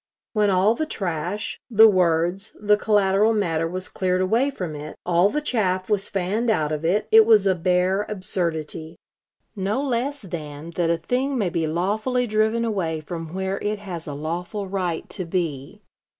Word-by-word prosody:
When 210 -2 +3
all 195 +3 +4
the 310 +6 -3
trash, 185 - -3
the 225 -1 +8
words, 180 0 +1
the 210 0 +4
collateral 205 0 +3
matter 165 -6 0
was 185 +2 -5
cleared 185 -1 -1
away 230 +9 +2
from 180 - -5
it, 150 +1 -7
all 175 +2 +3
the 300 - -1
chaff 190 -7 0
was 200 -2 +1
fanned 200 +5 -1
out 155 -8 +1
of 155 0 -3
it, 185 +6 +1
it 225 0 +9
was 215 -2 +5
a 190 - +4
bare 185 +3 +1
absurdity; 165 -5 -3 0.6
no 200 +5 -1
less 275 +1 -2
than 155 -3 -7
that 170 0 0
a 170 - +2
thing 260 +7 -1
may 200 -6 +1
be 165 -1 -1
lawfully 215 +10 0
driven 220 +1 +1
away 175 -8 -1
from 165 +1 -7
where 190 +1 -2
it 210 +1 -2
has 180 -6 -7
a 145 - -5
lawful 175 +7 -4
right 185 -4 -2
to 185 - -3
be.... 165 -6 -4
190 Hz, 175 wpm, -23 LUFS, 170-215 Hz, 0.6 s, it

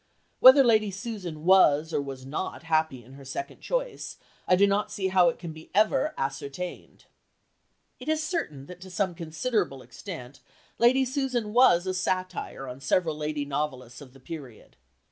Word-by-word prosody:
Whether 260 +2 +9
Lady 220 -4 +3
Susan 190 -6 -6
was 160 -4 +5
or - - +1
was 135 -2 -7
not 150 +3 -5
happy 160 -6 0
in 130 +4 -16
her 140 0 -12
second 345 - -6
choice, - - -3 0.3
I 180 - +5
do 200 +2 +5
not 200 +1 +1
see 190 -1 -2
how 185 -2 +5
it - - -5
can 165 -3 -8 0.2
ever 215 +7 +3
be - - -10
ascertained...." 140 +6 -5 0.9
It 255 +4 -6
is 315 0 +1
certain 310 - -3
that 180 +3 -12
to 185 - -10
some 185 -1 -1
considerable 165 - -2
extent 125 - -9 0.4
Lady 260 +3 +4
Susan 255 -5 -2
was 230 -8 +5
a 185 - -1
satire 185 -6 -3
on 125 +1 -8
several 160 +3 +1
lady 150 -1 -3
novelists 135 -4 -4
of 130 -3 -13
the 135 - -16
period. 135 -5 -10
175 Hz, 165 wpm, -27 LUFS, 140-210 Hz, 0.9 s, Whether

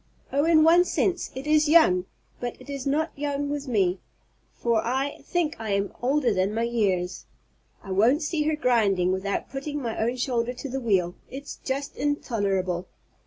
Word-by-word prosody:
Oh, 285 +2 +2
in 320 -2 +5
one 340 +2 +6
sense 365 0 0
it 265 +2 -6
is 300 0 +3
young! 190 - +5 0.3
but 245 -1 -5
it 285 - -10
is 275 -1 -4
not 310 +4 +1
young 285 0 -2
with 290 -1 -4
me, 195 -6 +1 0.6
for 235 -2 +1
I 265 +4 -1
think 335 -3 -1
I 220 -3 -2
am 200 0 -1
older 260 -2 +2
than 190 +2 0
my 230 - 0
years. 190 -7 -1 0.6
I 195 - -8
won't 235 - +3
see 310 0 -1
her 310 0 +1
grinding 205 -10 +2
without 190 +1 -2
putting 290 +2 -4
my 235 -5 -3
own 235 +3 0
shoulder 245 -1 -1
to 265 +3 -7
the 265 +1 -3
wheel. 185 -7 +1 0.2
It's 280 +2 -8
just 275 +1 -4
intolerable!" 195 -11 -1
250 Hz, 175 wpm, -26 LUFS, 200-290 Hz, 0.6 s, one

